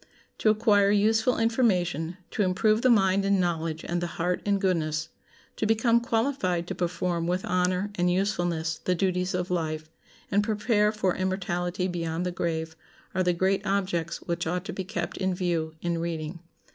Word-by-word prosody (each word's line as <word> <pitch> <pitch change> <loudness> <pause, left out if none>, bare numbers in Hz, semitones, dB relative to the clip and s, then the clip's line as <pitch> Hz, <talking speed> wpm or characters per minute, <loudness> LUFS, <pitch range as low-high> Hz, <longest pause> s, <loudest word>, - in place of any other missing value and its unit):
To 215 - +3
acquire 210 -2 +4
useful 220 +4 +3
information, 180 - +1
to - - -1
improve 215 +4 +2
the 255 - +4
mind 195 -4 +4
in 195 0 +2
knowledge 165 -3 -1
and 175 0 -1
the 175 - -1
heart 175 +1 0
in 200 -1 +2
goodness, 165 -4 0 0.5
to 215 - 0
become 230 +2 +3
qualified 225 -7 0
to - - -1
perform 175 -1 -1
with 180 +2 -1
honor 180 +2 0
and 180 -2 +1
usefulness 175 -4 0
the 180 - +1
duties 180 0 0
of 180 0 -2
life, 155 -2 -2 0.4
and 205 +1 +3
prepare 210 0 +2
for 205 -4 0
immortality 180 -1 -1
beyond 170 -1 -2
the 180 - -1
grave, 160 -2 -2 0.4
are 185 - +1
the 180 -1 +3
great 190 +3 +1
objects 185 -4 -1
which 170 -1 -2
ought 180 +3 -2
to - - -5
be 190 - -3
kept 175 -1 -4
in 190 -1 0
view 170 -3 -1
in 170 -1 0
reading. 165 0 -4
180 Hz, 170 wpm, -27 LUFS, 170-200 Hz, 0.5 s, acquire